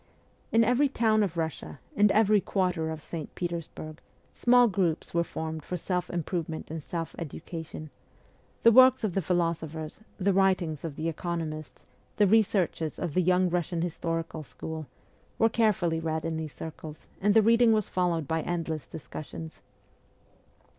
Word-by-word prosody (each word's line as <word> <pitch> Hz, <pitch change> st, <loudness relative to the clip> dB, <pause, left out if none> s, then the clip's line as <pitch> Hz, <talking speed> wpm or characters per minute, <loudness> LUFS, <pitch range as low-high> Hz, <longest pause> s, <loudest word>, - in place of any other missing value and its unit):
In 225 Hz, 0 st, +5 dB
every 250 Hz, +5 st, +3 dB
town 220 Hz, -4 st, +2 dB
of 190 Hz, -5 st, 0 dB
Eussia, 160 Hz, -3 st, -4 dB, 0.2 s
in 205 Hz, 0 st, +5 dB
every 210 Hz, -1 st, +4 dB
quarter 180 Hz, -5 st, 0 dB
of 160 Hz, -2 st, -6 dB
St. 160 Hz, -3 st, -7 dB
Petersburg, 165 Hz, -2 st, -5 dB, 0.3 s
small 245 Hz, 0 st, +5 dB
groups 180 Hz, -6 st, -1 dB
were 170 Hz, 0 st, +2 dB
formed 160 Hz, -1 st, -5 dB
for 180 Hz, -, -4 dB
self 180 Hz, 0 st, -2 dB
improve 170 Hz, -1 st, -2 dB
ment 160 Hz, -1 st, -6 dB
and 160 Hz, 0 st, -4 dB
self 165 Hz, +1 st, -5 dB
education; 160 Hz, -1 st, -7 dB, 0.7 s
the 230 Hz, -, +8 dB
works 255 Hz, +1 st, +7 dB
of 210 Hz, -5 st, 0 dB
the 195 Hz, -, +1 dB
philosophers, 165 Hz, -1 st, -2 dB, 0.2 s
the 195 Hz, +1 st, +2 dB
writings 185 Hz, -6 st, +2 dB
of 160 Hz, -4 st, -5 dB
the 160 Hz, +2 st, -3 dB
economists, 160 Hz, -2 st, -4 dB, 0.3 s
the 210 Hz, -, +5 dB
researches 190 Hz, -7 st, +2 dB
of 175 Hz, -5 st, -3 dB
the 185 Hz, -, +3 dB
young 180 Hz, 0 st, +3 dB
Eussian 175 Hz, -1 st, -1 dB
historical 165 Hz, -1 st, -3 dB
school, 160 Hz, 0 st, -7 dB, 0.5 s
were 225 Hz, -, +4 dB
carefully 205 Hz, -8 st, +2 dB
read 160 Hz, -1 st, -2 dB
in 165 Hz, -1 st, -2 dB
these 155 Hz, -4 st, -5 dB
circles, 155 Hz, -1 st, -8 dB, 0.2 s
and 205 Hz, +2 st, +3 dB
the 220 Hz, -, +7 dB
reading 230 Hz, +1 st, +5 dB
was 215 Hz, -2 st, +2 dB
followed 170 Hz, -5 st, 0 dB
by 160 Hz, +1 st, 0 dB
endless 160 Hz, -3 st, -3 dB
discussions. 160 Hz, +2 st, -8 dB
170 Hz, 155 wpm, -28 LUFS, 160-195 Hz, 0.7 s, the